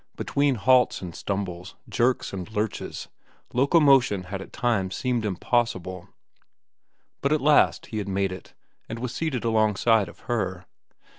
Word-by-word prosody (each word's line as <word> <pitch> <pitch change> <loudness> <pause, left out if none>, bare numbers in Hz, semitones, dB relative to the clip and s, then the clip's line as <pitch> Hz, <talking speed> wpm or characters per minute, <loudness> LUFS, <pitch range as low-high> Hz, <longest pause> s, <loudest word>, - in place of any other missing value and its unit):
Between 140 -1 +1
halts 125 -1 +3
and 85 -2 -6
stumbles, 90 -1 -4
jerks 125 -2 0
and 95 +1 -6
lurches, 105 -1 -3 0.5
locomotion 135 - +4
had 95 +1 -6
at - - -11
times 100 -6 0
seemed 125 -3 -1
impossible. 95 -3 -1 1.1
But 140 - +1
at 155 - +3
last 150 +1 +3
he 110 - -5
had 100 - -4
made 95 0 0
it, 95 - -10 0.3
and 115 - -4
was 120 0 -4
seated 145 -4 -2
alongside 110 -2 +2
of - - -16
Her. 95 -6 -3
110 Hz, 140 wpm, -25 LUFS, 95-125 Hz, 1.1 s, locomotion